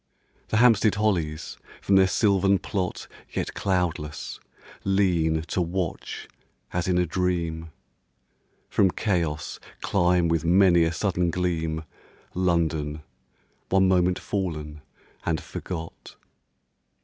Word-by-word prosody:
The 110 - 0
Hampstead 115 -3 +5
hollies, 85 -8 -1 0.2
from 100 - +2
their 95 -1 +6
sylvan 100 -1 +3
plot 95 0 -3 0.2
Yet - - -3
cloudless, 90 -5 -2 0.4
lean 85 -5 +2
to 85 +2 -2
watch 90 0 -3 0.5
as 90 0 -1
in 90 -1 +2
a 90 - +3
dream, 85 -2 -1 1.0
From 95 - +3
chaos 85 -7 -1 0.2
climb 90 -1 +2
with 85 -1 +1
many 85 0 +5
a 80 - 0
sudden 90 0 0
gleam, 80 -3 -1 0.5
London, 80 -4 0 0.7
one 95 0 +4
moment 90 -1 +3
fallen 75 -6 -4 0.4
and - - 0
forgot. 80 -2 -7
90 Hz, 105 wpm, -25 LUFS, 80-95 Hz, 1.0 s, their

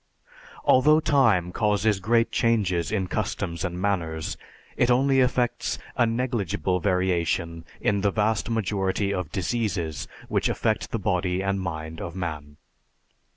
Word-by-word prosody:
Although 150 +4 +5
time 110 - +3
causes 105 0 +1
great 115 +4 +2
changes 100 -7 +1
in 100 -4 0
customs 85 -1 -3
and 90 -2 -3
manners, 85 -5 -1 0.4
it 120 - +2
only 135 +2 +4
effects 125 -1 +1 0.2
a 120 - +3
negligible 110 - -1
variation 85 -3 0
in 100 -1 +1
the 100 - +3
vast 105 -1 0
majority 100 -2 0
of 90 -5 -3
diseases 95 - -2 0.2
which - - +1
affect - - -1
the - - -2
body 90 +1 0
and 100 0 0
mind 80 -2 -5
of 85 0 -6
man. 75 -5 -5
95 Hz, 130 wpm, -25 LUFS, 85-115 Hz, 0.4 s, Although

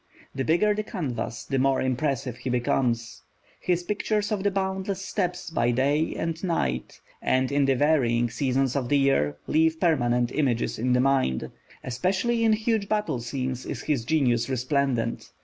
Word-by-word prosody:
The 135 - -2
bigger 175 +8 +3
the 210 - -1
canvas, 150 - -4
the 135 - -1
more 135 0 +2
impressive 130 -1 -1
he 125 +1 -5
becomes. 120 -1 0 0.4
His 180 -1 0
pictures 210 +2 -1
of 210 -2 0
the 200 - +2
boundless 190 0 -2
steppes 180 -4 -2
by 120 -7 +1
day 140 +6 +1
and 165 +1 -3
night, 65 - -2 0.2
and 130 +1 +1
in 140 0 +3
the 135 -1 +3
varying 125 -5 +2
seasons 135 -1 0
of 130 -3 -1
the 145 - +4
year, 105 - +2
leave 160 +1 +2
permanent 120 -8 +2
images 130 -8 0
in 125 +2 +1
the 125 - +3
mind. 135 - +1 0.3
Especially 190 - 0
in 220 -1 +4
huge 215 -2 0
battle 210 - 0
scenes 130 +1 -3
is - - -5
his 145 -6 0
genius 125 -4 +1
resplendent. 130 -2 -1
135 Hz, 165 wpm, -26 LUFS, 125-180 Hz, 0.4 s, the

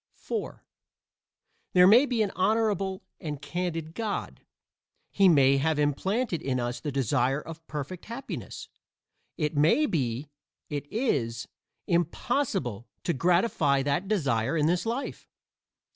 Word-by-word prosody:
(4) 450 - -5 1.1
There 180 -1 +7
may 235 +9 +7
be 235 -4 +1
an 200 - -2
honorable 195 -1 +1 0.2
and 150 -5 -5
candid 165 +1 -3
God. 220 -1 -4 0.7
He 195 -1 +5
may 140 -4 +5
have 155 +2 +1
implanted 175 - 0
in 130 -2 -1
us 120 0 -2
the 145 - -4
desire 135 +1 +1
of 165 +1 -10
perfect 150 +4 -6
happiness. 235 +4 -7 0.7
It 150 -2 -1
may 155 - +4
be 135 - -2 0.4
it 145 0 -4
is 120 - -1 0.4
impossible 170 - -1 0.2
to 170 - 0
gratify 165 - +2
that 145 +7 0
desire 140 - +1
in 150 - +2
this 175 +5 +1
life. 240 +5 -4
160 Hz, 125 wpm, -28 LUFS, 140-195 Hz, 1.1 s, There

